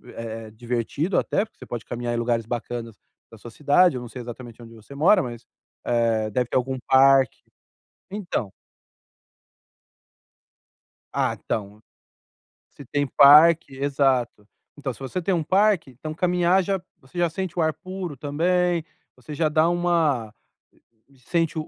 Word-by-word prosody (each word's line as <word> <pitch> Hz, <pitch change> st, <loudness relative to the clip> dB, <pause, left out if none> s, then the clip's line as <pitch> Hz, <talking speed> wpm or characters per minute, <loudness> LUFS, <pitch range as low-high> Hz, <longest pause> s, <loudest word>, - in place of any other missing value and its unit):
é 115 Hz, -1 st, -7 dB
divertido 120 Hz, -, -2 dB
até, 200 Hz, -, 0 dB
porque 220 Hz, -, -15 dB
você -, -, -10 dB
pode 120 Hz, -2 st, -6 dB
caminhar 120 Hz, 0 st, -4 dB
em 120 Hz, -, -1 dB
lugares 115 Hz, -1 st, 0 dB
bacanas 115 Hz, -1 st, -5 dB, 0.4 s
da 115 Hz, -, -13 dB
sua 115 Hz, +2 st, -11 dB
cidade, 150 Hz, +4 st, +3 dB
eu 125 Hz, -, -5 dB
não 120 Hz, -, -8 dB
sei 125 Hz, -, -8 dB
exatamente 120 Hz, 0 st, -10 dB
onde 115 Hz, 0 st, -13 dB
você 115 Hz, +5 st, -14 dB
mora, 165 Hz, +9 st, +4 dB
mas, 120 Hz, -2 st, -7 dB, 0.4 s
eh, 115 Hz, -2 st, +1 dB
deve 125 Hz, +2 st, -1 dB
ter -, -, -4 dB
algum 130 Hz, +1 st, -1 dB
parque. 135 Hz, -2 st, +5 dB, 0.7 s
Então 175 Hz, -, -3 dB, 2.6 s
Ah, -, -, 0 dB
então, 105 Hz, 0 st, -4 dB, 0.9 s
se 140 Hz, -, -13 dB
tem 145 Hz, +3 st, -1 dB
parque 150 Hz, +1 st, +6 dB
exato, 135 Hz, -5 st, 0 dB, 0.3 s
então 140 Hz, -3 st, -4 dB
se -, -, -16 dB
você 135 Hz, +7 st, -4 dB
tem 190 Hz, -, 0 dB
um 170 Hz, -3 st, 0 dB
parque, 190 Hz, -4 st, +2 dB
então 155 Hz, +5 st, -7 dB
caminhar 180 Hz, +2 st, +2 dB
já 195 Hz, 0 st, -1 dB, 0.2 s
você 130 Hz, +6 st, -18 dB
já 175 Hz, -1 st, +2 dB
sente 180 Hz, +1 st, -5 dB
o 170 Hz, -, +1 dB
ar 160 Hz, -, +2 dB
puro 185 Hz, -3 st, -7 dB
também, 170 Hz, +4 st, 0 dB, 0.3 s
você 130 Hz, +4 st, -11 dB
já 155 Hz, +1 st, +1 dB
dá 155 Hz, +2 st, +3 dB
uma 165 Hz, -10 st, 0 dB, 0.8 s
sente 165 Hz, +5 st, -1 dB
140 Hz, 150 wpm, -24 LUFS, 120-170 Hz, 2.6 s, parque